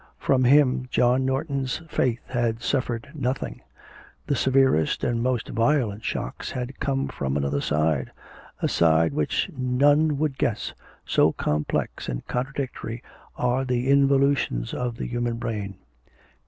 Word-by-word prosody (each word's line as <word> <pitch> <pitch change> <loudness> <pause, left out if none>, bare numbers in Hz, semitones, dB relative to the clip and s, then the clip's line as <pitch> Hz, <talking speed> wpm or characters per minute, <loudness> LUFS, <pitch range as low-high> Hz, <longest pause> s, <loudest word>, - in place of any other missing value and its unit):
From 130 -2 +2
him 130 -1 +4
John 125 +1 +2
Norton's 135 0 -2
faith 125 -5 -1
had 120 -2 -1
suffered 125 -1 -1
nothing; 135 -3 -3 0.6
the 140 - 0
severest 130 - +2
and 115 -1 0
most 125 -1 -1
violent 115 -4 +1
shocks 60 - -4
had 125 +1 -5
come 135 0 0
from 70 - -2
another 70 0 0
side 75 -2 0 0.5
a - - +4
side 80 -1 +3
which 75 - 0
none 145 +4 +3
would 145 -2 -1
guess, 110 - -1 0.3
so - - +3
complex 75 0 -2
and - - -4
contradictory 125 -2 -4 0.3
are 125 +2 +1
the 125 +1 0
involutions 140 - +2
of 120 -2 -3
the - - -4
human 120 -1 -2
brain. 105 -4 -4
125 Hz, 130 wpm, -25 LUFS, 110-135 Hz, 0.6 s, him